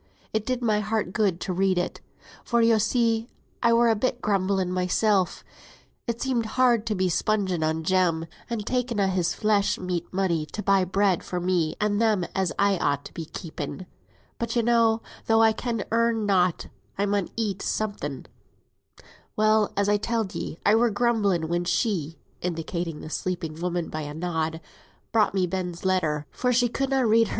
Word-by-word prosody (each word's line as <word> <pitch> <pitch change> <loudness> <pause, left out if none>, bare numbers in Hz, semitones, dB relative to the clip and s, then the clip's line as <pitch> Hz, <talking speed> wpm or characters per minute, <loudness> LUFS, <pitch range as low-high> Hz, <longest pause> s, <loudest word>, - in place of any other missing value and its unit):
It 220 0 -1
did 255 -1 -1
my 215 -2 +2
heart 210 -3 -2
good 200 -5 +1
to 185 - -2
read 190 0 +2
it; 180 - -2 0.4
for, 235 - +1
yo 230 -1 +4
see, 230 0 +1 0.3
I 235 - +4
were 235 +1 +5
a 225 - +4
bit 245 +3 -1
grumbling 190 -3 0
mysel; 185 +1 +2 0.8
it 235 0 -2
seemed 245 -4 0
hard 240 -4 +3
to 215 - 0
be 185 -1 +1
spunging 190 -1 0
on 160 +1 0
Jem, 170 -2 +2 0.2
and 225 -3 -3
taking 250 -2 -1
a' 200 - +3
his 180 -2 0
flesh 210 -2 +2
meat 180 -2 -3
money 175 -5 0
to 210 - -6
buy 195 -2 +3
bread 195 -1 +1
for 180 - -3
me 175 -3 0
and 210 0 +1
them 215 -6 +2
as 190 -3 0
I 200 -2 +2
ought 140 - 0
to - - -10
be 165 - -5
keeping. 160 +1 -6 0.5
But, 235 0 -2
yo 235 - +2
know, 230 -1 +3 0.2
though 225 0 +5
I 220 - +6
can 230 -2 -3
earn 230 -1 +2
nought, 185 -4 +2 0.3
I 200 - +1
mun 200 -2 0
eat 210 -4 -1
summut. 200 -11 -3 1.1
Well, 215 0 +3
as 200 0 +2
I 205 0 +3
telled 225 -2 -2
ye, - - -5
I 205 - +5
were 235 +2 +4
grumbling, 205 -6 +1
when 175 +1 0
she 175 -5 -1 0.2
(indicating 170 -1 -3
the 155 - -8
sleeping 165 -3 -3
woman 175 -1 -2
by 155 - -4
a 145 0 -6
nod) 160 -1 -2 0.5
brought 215 -3 +2
me 185 -1 +2
Ben's 180 0 -4
letter, 155 -6 +1
for 250 - 0
she 245 0 +3
could 270 +3 -1
na 270 -1 +2
read 225 -1 +4
hersel. - - -8
200 Hz, 185 wpm, -25 LUFS, 175-225 Hz, 1.1 s, I